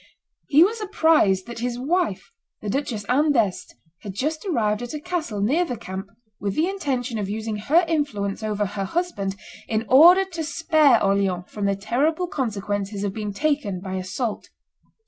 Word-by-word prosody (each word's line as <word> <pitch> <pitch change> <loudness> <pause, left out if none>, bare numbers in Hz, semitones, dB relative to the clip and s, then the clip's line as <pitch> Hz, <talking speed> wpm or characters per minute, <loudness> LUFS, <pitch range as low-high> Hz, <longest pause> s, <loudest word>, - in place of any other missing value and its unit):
He 305 +3 +6
was 440 +4 0
apprised 320 - +3
that 235 -1 -8
his 240 0 -2
wife, 320 - -1 0.3
the 210 - -4
Duchess 245 -6 -2
Anne 290 +4 +3
d'Este, 215 -8 0 0.2
had 195 -3 -8
just 310 +7 -2
arrived 215 - 0
at 245 +5 -5
a - - -4
castle 315 - -3
near 280 - +2
the 250 -9 -4
camp 190 0 -6 0.3
with 200 -1 -2
the 320 +3 +2
intention 265 - -2
of 200 -2 -3
using 215 0 -3
her 315 - +3
influence 230 -12 -1
over 210 -1 -1
her 195 0 -3
husband 200 - -2 0.3
in 220 0 -1
order 345 - +7
to 340 -4 -5
spare 310 -2 +3
Orleans 195 -2 +1
from 205 -1 -4
the 200 - +1
terrible 280 - 0
consequences 205 - -3
of 200 -2 -2
being 210 -1 -4
taken 280 -5 -1
by 190 0 -6
assault. 195 +5 -3
235 Hz, 170 wpm, -23 LUFS, 200-310 Hz, 0.3 s, order